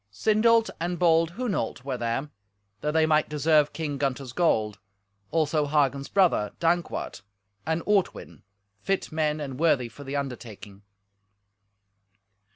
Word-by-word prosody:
Sindolt 225 - +3
and 175 +1 -2
bold 165 -1 +3
Hunolt 200 - -3
were 135 -2 -2
there, 120 +5 -3 0.5
that 150 - -1
they 160 0 +4
might 155 -1 +2
deserve 150 0 +3
King 145 -4 -4
Gunther's 135 -2 -2
gold; 110 - +1 0.5
also 155 -2 +1
Hagen's 140 -2 +1
brother, 175 - +2
Dankwart, 175 +1 -1 0.5
and 160 +1 0
Ortwin, 205 -3 -1 0.4
fit 195 - -2
men 155 -1 0
and 135 -3 -6
worthy 140 -7 +2
for 145 - -12
the 140 +1 -5
undertaking. 115 -7 -6
150 Hz, 125 wpm, -26 LUFS, 135-170 Hz, 0.5 s, they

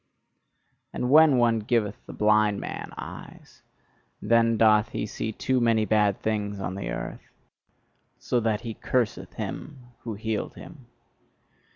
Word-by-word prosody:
And 125 - -2
when 155 -2 +7
one 115 -2 +3
giveth 110 -2 -1
the - - -8
blind 105 -1 +3
man - - -6
eyes, - - -10 0.6
then 115 +1 +3
doth 110 0 +4
he - - -3
see 110 +1 -4
too 130 +4 0
many 115 -2 +3
bad 105 -1 +2
things 105 -2 -2
on 95 -1 -3
the 100 - -5
earth: - - -6 0.9
so 125 - 0
that 110 -2 0
he 115 -2 -5
curseth 120 0 -2
him 150 -1 -6 0.2
who 115 -3 -6
healed 110 0 -3
him. 140 -8 -13
110 Hz, 140 wpm, -26 LUFS, 105-120 Hz, 0.9 s, when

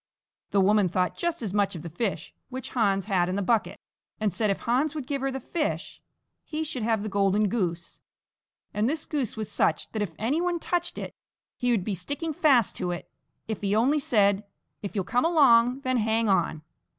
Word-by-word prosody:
The 200 - +2
woman 205 -1 +4
thought 180 0 0
just 345 -6 -2
as 200 -4 -3
much 205 -2 +1
of 160 - -7
the 170 - -6
fish 185 -3 -3 0.2
which 260 -1 -6
Hans 200 -5 +1
had 185 -4 +1
in 185 - -1
the 200 - -1
bucket, 225 +2 +1 0.4
and 210 -4 0
said 210 +3 +1
if 195 - -1
Hans 270 +6 +1
would 295 -4 -4
give 280 0 -2
her 270 - 0
the 265 0 -4
fish 305 +5 -3 0.4
he 315 0 -3
should 290 -5 -4
have 220 -1 +1
the - - -3
golden 200 +1 +2
goose; 180 -6 -3 0.7
and 210 +3 +1
this 310 +1 -2
goose 270 -8 -2
was 215 -2 -4
such - - +1
that 220 - -3
if 190 -6 -2
any 270 +10 0
one 355 -1 0
touched 350 +1 -1
it - - -5 0.4
he 245 - -1
would 225 -6 +2
be 210 - -2
sticking 285 - -4
fast 280 - +3
to 180 - -2
it 175 -1 -5 0.4
if 220 -1 -4
he 200 0 +1
only 265 +7 +3
said: 205 -6 +2 0.4
"If 200 - -6
you'll 195 - 0
come 245 +7 +1
along, 265 -6 +5
then 255 -1 0
hang 225 0 +1
on." 175 -5 +1
220 Hz, 210 wpm, -27 LUFS, 195-270 Hz, 0.7 s, along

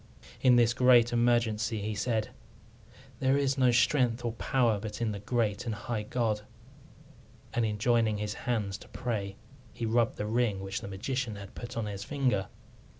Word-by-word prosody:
In 125 -2 +6
this 120 -1 +4
great 120 -2 +5
emergency 115 -2 +1
he 105 +1 -3
said, 110 +1 -1 0.9
"There 135 +1 +3
is 135 -1 +1
no 130 -1 +5
strength 120 0 +2
or 120 - 0
power 115 -2 +1
but 105 +2 -6
in 115 -2 0
the 100 - -5
great 110 0 -1
and 110 - -1
high 105 +1 -3
God"; 105 -1 -1 1.1
and 120 - +1
in 105 -1 -2
joining 115 -1 +2
his 105 0 -3 0.2
hands 105 -4 -1
to - - -14
pray 105 -6 -3 0.4
he 115 - -4
rubbed 115 +1 +1
the 105 - -2
ring 110 -2 +1
which 95 0 -4
the - - -7
magician 115 +4 -3
had 100 -1 -10
put 120 0 -7
on 115 - -1
his 100 -1 -5
finger. 125 -7 0
115 Hz, 175 wpm, -30 LUFS, 105-120 Hz, 1.1 s, In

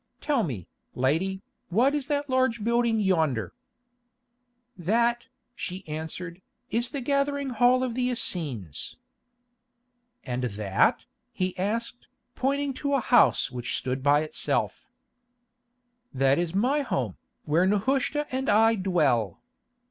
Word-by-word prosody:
Tell 285 -5 +1
me, 120 - -4 0.3
lady, 175 +10 0 0.3
what 240 +10 +3
is 290 -2 -2
that 290 -1 -1
large 255 -4 +1
building 235 0 +2
yonder?" 160 - +1 1.2
"That," 235 +6 +1 0.3
she 185 -5 -6
answered, 160 +3 -6 0.3
"is 235 +2 0
the 280 -2 -4
gathering 280 +1 0
hall 245 +2 +4
of 250 -2 -2
the 250 +1 0
Essenes." 140 - -3 1.3
"And 125 0 -2
that?" 100 -3 +1 0.3
he 185 0 -2
asked, 230 +5 -3 0.3
pointing 275 +1 0
to 280 -1 +1
a - - +3
house 240 - +4
which 125 -1 -3
stood 130 0 -3
by 145 +2 +4
itself. 155 - -2 1.2
"That 135 +2 +2
is 175 0 -2
my 260 +9 +2
home, 130 - -2 0.3
where 165 +5 +3
Nehushta 270 +8 +1
and 265 +1 -1
I 225 +2 +5
dwell." 155 - +1
205 Hz, 120 wpm, -27 LUFS, 150-255 Hz, 1.3 s, I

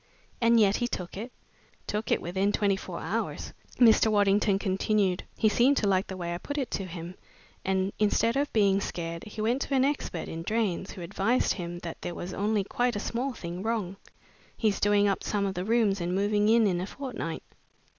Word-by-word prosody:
"And 230 0 +5
yet 205 -2 +4
he 240 - 0
took 180 -7 -5
it?" 225 +6 -6 0.5
"Took 210 +2 -3
it - - +2
within 190 +4 0
twenty 200 -1 +2
four 195 - -7
hours," - - -3 0.2
Mr. 225 -2 +6
Waddington 205 -1 +3
continued. 195 -1 +1 0.2
"He 220 - +3
seemed 245 +6 +4
to 205 - +1
like 190 -1 +2
the 190 - -6
way 170 -1 -3
I 175 - -4
put 285 +9 -5
it 270 -4 -2
to 195 - -2
him, 170 0 -7 0.5
and 190 0 0
instead 215 +2 +2
of 285 +1 0
being 200 -2 +3
scared 165 -2 -4
he 215 0 -6
went 240 +5 +1
to 275 - -1
an 260 0 +4
expert 280 - -2
in 165 - -5
drains, 200 -1 -1
who 185 - -9
advised 200 +8 +1
him 175 -2 -5
that 165 -1 -6
there 175 - -5
was 180 +1 -6
only 210 0 0
quite 245 +4 0
a - - -1
small 250 +5 -2
thing 175 -3 -6
wrong. 215 -4 -2 0.6
He's 215 -3 +1
doing 205 0 +4
up 195 - 0
some 205 -1 0
of 195 - -1
the 180 0 -3
rooms 215 -4 +2
and 175 +1 -1
moving 205 +2 +2
in 230 0 +5
in 180 -3 +1
a 185 - -4
fortnight." 245 - -5
205 Hz, 205 wpm, -28 LUFS, 185-225 Hz, 0.6 s, Mr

